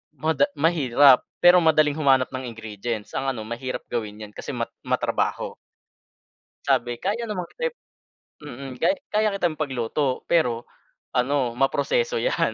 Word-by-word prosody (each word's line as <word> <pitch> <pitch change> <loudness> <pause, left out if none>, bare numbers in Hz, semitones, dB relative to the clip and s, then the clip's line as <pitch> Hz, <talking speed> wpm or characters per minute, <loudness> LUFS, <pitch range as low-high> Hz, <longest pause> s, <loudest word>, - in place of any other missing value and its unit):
mada 160 - +2
mahirap 140 -4 +4 0.2
pero 175 +1 +8
madaling 155 -3 +4
humanap 135 -4 +3
ng 130 0 -5
ingredients, 110 -1 -5
ang 135 - -2
ano 120 -5 -2
mahirap 120 +3 -5
gawin 110 -2 -4
yan 105 - -10
kasi - - -7
mat - - -3 0.2
matrabaho. - - -1 1.1
Sabi 120 0 +1
kaya 210 +5 -1
naman 200 -6 -4
kita 485 0 -1 0.7
mm, 135 -2 -8
kay - - +3 0.2
kaya 215 0 +2
kitang 175 -5 0
ipagluto 130 -1 -1
pero 120 -9 +2 0.5
ano 125 0 +1
ma-proseso 475 - +1
'yan - - +1
135 Hz, 135 wpm, -24 LUFS, 120-170 Hz, 1.1 s, pero